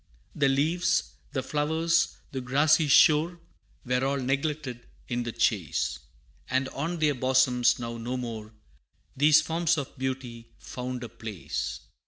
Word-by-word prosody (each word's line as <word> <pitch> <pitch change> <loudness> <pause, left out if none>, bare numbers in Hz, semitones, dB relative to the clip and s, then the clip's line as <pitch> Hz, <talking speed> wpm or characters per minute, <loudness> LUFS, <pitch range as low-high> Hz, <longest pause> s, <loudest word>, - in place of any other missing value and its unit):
The 140 -2 +2
leaves, 165 +5 +1 0.2
the 130 - -2
flowers, 160 +4 +1
the 135 -2 -4
grassy 145 +5 +3
shore, 160 +4 +5 0.5
Were 125 +1 0
all 140 +1 +1
neglected 135 -1 -2 0.2
in 120 -1 -2
the 120 -1 -3
chase, 80 - 0 0.5
And 130 +1 +1
on 165 +5 -3
their 155 -2 +2
bosoms 130 -1 +3
now 115 -1 -5
no 125 +3 -3
more 110 -3 -6 0.6
These 150 +3 +6
forms 165 +1 +1
of 140 -3 -5
beauty 130 -3 -5
found 125 0 -6
a 120 - -6
place. 105 - -5
130 Hz, 135 wpm, -27 LUFS, 120-150 Hz, 0.6 s, These